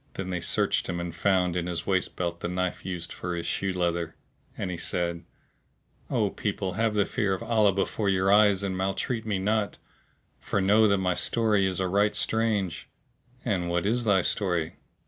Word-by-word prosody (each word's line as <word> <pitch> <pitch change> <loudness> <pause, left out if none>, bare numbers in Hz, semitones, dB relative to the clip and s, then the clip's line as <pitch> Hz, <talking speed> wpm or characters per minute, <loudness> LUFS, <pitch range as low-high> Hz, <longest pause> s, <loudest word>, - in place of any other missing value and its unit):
Then 95 -1 -4
they 90 - -1
searched 85 - +1
him 85 -1 -2
and 85 -1 -4
found 90 0 +1
in 90 -1 -1
his 85 -1 -3
waist 95 -2 0
belt 85 -1 -3
the - - -3
knife 90 0 -2
used 90 -2 -5
for 90 0 -4
his 85 - -4
shoe 95 - -1
leather; 85 -2 -1 0.4
and 95 - -3
he - - -3
said, 85 0 -2 0.8
"O - - +1
people, 95 -1 -3
have 110 +2 0
the 100 -1 +3
fear 95 -2 0
of 95 - -7
Allah 110 -3 +3
before 100 +2 -1
your 95 0 +2
eyes 105 -2 +5
and 95 -2 -2
maltreat 95 +5 -2
me 105 -3 0
not, 105 +2 0 0.6
for - - -1
know 105 +3 +5
that 100 -1 +3
my 90 -1 +1
story 105 0 +2
is 95 -1 -2
a 95 - 0
right 100 +3 +2
strange!" 105 -6 0 0.6
"And 95 -7 0
what 85 +1 0
is 120 +4 +1
thy 100 -5 +3
story?" 85 -5 0
95 Hz, 190 wpm, -27 LUFS, 90-105 Hz, 0.8 s, eyes